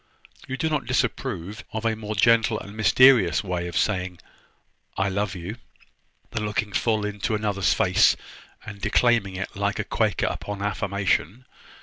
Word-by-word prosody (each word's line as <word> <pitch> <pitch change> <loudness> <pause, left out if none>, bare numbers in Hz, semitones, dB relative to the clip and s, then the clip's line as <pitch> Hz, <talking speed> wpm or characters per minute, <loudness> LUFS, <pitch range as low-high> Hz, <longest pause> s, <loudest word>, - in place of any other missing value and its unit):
You 135 - -4
do 160 - 0
not 150 -3 -1
disapprove 100 +6 -2
of 110 +1 -4
a 115 -1 +1
more 110 0 -5
gentle 115 0 +3
and 100 +1 -10
mysterious 110 - +5
way 90 -2 -3
of 85 - -4
saying, 90 -3 0 0.8
`I 95 0 0
love 100 -1 -1
you,' 90 +6 -6 0.7
than 110 - -3
looking 105 0 -2
full 110 -3 +1
in 105 0 -5
one 110 -2 0
another's 100 -3 +1
face, - - +4 0.5
and 100 -2 -9
declaiming 105 -2 +2
it 95 +3 -5
like 100 0 -1
a - - -1
Quaker - - 0
upon 100 -1 -4
affirmation? 100 +2 -1
105 Hz, 155 wpm, -24 LUFS, 95-110 Hz, 0.8 s, mysterious